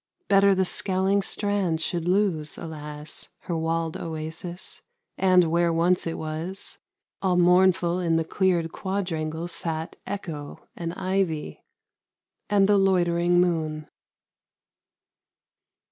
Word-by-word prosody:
Better 195 0 +5
the 190 0 +2
scowling 190 +2 +1
Strand 195 -5 0
should 170 +1 -1
lose, 180 -5 +1
alas, 150 -2 -8
Her 175 - -3
walled 165 0 -1
oasis, 165 +2 -6 0.3
and 185 -1 +5
where 170 0 +3
once 170 +2 +2
it 165 - -3
was, 160 +5 -6 0.4
All 185 -2 +2
mournful 180 0 +4
in 170 -2 +1
the 165 0 +1
cleared 175 -2 +1
quadrangle 170 -4 -3
sat 165 -2 -5
Echo, 160 -7 -6
and 170 0 -4
ivy, 185 -5 -2 0.9
and 200 -1 +4
the 205 -1 +4
loitering 175 -2 +3
moon. 155 -4 0
175 Hz, 110 wpm, -25 LUFS, 160-190 Hz, 0.9 s, Better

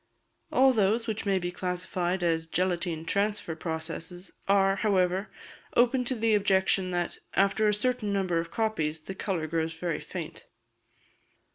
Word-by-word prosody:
All 265 0 +5
those 220 +1 +2
which 220 -2 -3
may 195 -1 +3
be 175 -1 -2
classed 180 0 -4
as 175 -2 0
"gelatine 175 -2 -1
transfer" 200 -2 0
processes 165 +2 -6 0.2
are, 195 0 +4
however, 190 -1 +1 0.5
open 250 +1 +4
to 255 - 0
the 225 -1 +2
objection 190 -2 +3
that, 175 -1 -2 0.2
after 200 +2 +3
a 210 - +3
certain 220 -1 0
number 185 -4 +1
of 165 0 -4
copies, 160 -9 -1
the 190 - -7
colour 190 -4 -2
grows 160 0 -1
very 165 -1 -2
faint. - - -7
190 Hz, 145 wpm, -28 LUFS, 170-210 Hz, 0.5 s, All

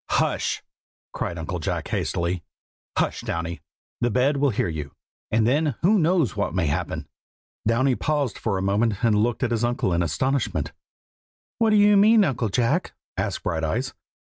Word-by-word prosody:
"Hush!" - - 0 0.5
cried 85 - -3
Uncle 85 +2 -4
Jack 75 - -3
hastily. 85 +1 -1 0.6
"Hush, - - 0
Downy! 85 -2 -4 0.4
the 120 - +1
bed 130 +5 +2
will 140 0 +3
hear 105 - 0
you, 75 -4 -5 0.4
and 110 0 +2
then 145 +2 +2
who 205 +4 +5
knows 165 - +2
what 105 -2 -1
may 90 -3 +1
happen?" 80 +3 -2 0.6
Downy 130 +4 +3
paused 145 -3 -1
a 100 -4 0
moment 100 +2 +1
and 115 -3 +4
looked 115 +4 +1
at 120 - 0
his 115 0 0
uncle 120 -6 0
in 85 - +1
astonishment. 125 - -1 0.9
"What 225 -1 +4
do 215 - +4
you 205 0 +6
mean, 215 +2 +6
Uncle 120 - 0
Jack?" 125 - 0 0.2
asked - - -2
Brighteyes. 80 -1 -1
115 Hz, 160 wpm, -24 LUFS, 90-140 Hz, 0.9 s, you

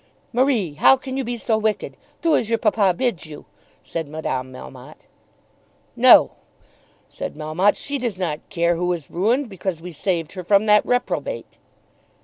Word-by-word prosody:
"Marie, 240 - +1
how 210 - +5
can 260 0 -7
you 270 - -1
be 240 0 -4
so 220 -1 0
wicked? 215 -1 -2 0.3
Do 330 -2 +4
as 225 - 0
your 230 - +2
papa 210 -3 +2
bids 230 - -1
you," 150 -1 -11 0.4
said 165 -3 -5
Madame 130 -4 -4
Melmotte. 95 - -12 0.9
"No!" - - +7 0.8
said - - -7
Melmotte. 155 +6 +1
"She 285 0 -3
does 235 -6 -3
not 165 -5 -2
care 170 -2 +1
who 180 +1 0
is 165 -5 -7
ruined, 235 +10 +1
because 190 -4 -4
we 175 +2 -8
saved 165 0 -2
her 185 - -7
from 200 +3 +3
that 210 -1 +5
reprobate." 250 - -2
195 Hz, 160 wpm, -22 LUFS, 165-235 Hz, 0.9 s, No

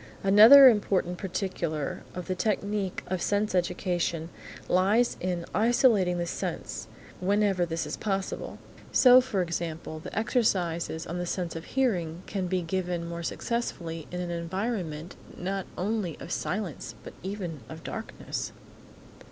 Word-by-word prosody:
Another 220 +8 +10
important 195 -6 +2
particular 175 -6 -3
in 180 - -3
the 185 - -2
technique 200 -1 -1
of 185 -1 -3
sense 205 0 +1
education 175 -2 -1 0.4
lies 205 +7 +3
in 175 -2 -2
isolating 215 -4 +3
the 175 - -1
sense, - - -4 0.3
whenever 195 -1 +2
this 165 -1 -2
is 150 - -4
possible. 195 -2 -3 0.3
So, 255 0 +8
for 210 -7 -1
example, 165 -2 -4
the 155 - -8
exercises 180 -8 0
on 175 +2 -4
the 175 - -3
sense 175 -2 -3
of 165 - -6
hearing 180 -10 0
can 190 -3 -3
be 180 0 0
given 175 -1 -2
more 170 0 -5
successfully 170 -6 -3
in 180 - -5
an 175 -1 -3
environment 170 -2 -3 0.2
not 190 +1 -3
only 195 -4 -1
of 175 - -8
silence, 170 - -3
but - - -9
even 185 -5 -5
of - - -9
darkness. - - -5
180 Hz, 135 wpm, -28 LUFS, 170-205 Hz, 0.4 s, Another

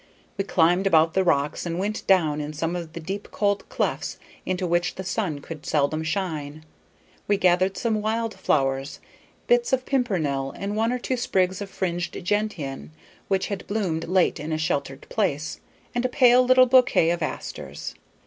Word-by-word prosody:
We 195 - -1
climbed 180 +2 +3
about 160 -3 +4
the 190 - +3
rocks 145 -4 +1
and 170 -1 -3
went 205 +3 -3
down 160 -6 +3
in 150 +1 -5
some 165 +3 -2
of 170 -2 -6
the 170 - -6
deep 195 +5 -5
cold 205 -1 -1
clefts - - -2 0.3
into 185 0 -1
which 175 0 0
the 190 - -5
sun 175 -6 -2
could 155 0 -9
seldom 150 +1 +1
shine. 155 -3 -3 0.6
We 205 - +3
gathered 185 +1 +2
some 220 -3 0
wild 225 +1 -1
flowers; 135 -7 0 0.5
bits 480 - +2
of 260 -1 +1
pimpernel 155 - 0
and 200 +1 -3
one 225 +2 +1
or 250 - 0
two 255 +1 -2
sprigs 190 -5 0
of 200 - -5
fringed 175 -2 -3
gentian 170 - -2 0.4
which 195 -1 +1
had 200 -3 -5
bloomed 185 -6 -1
late 185 -2 +2
in 150 +2 -5
a 155 - 0
sheltered 140 -3 -2
place, 155 -8 -1 0.3
and 240 0 0
a 255 - +1
pale 250 -1 +6
little 255 0 +6
bouquet 250 -9 +4
of 175 0 -2
asters. 155 - -5
185 Hz, 175 wpm, -25 LUFS, 155-210 Hz, 0.6 s, pale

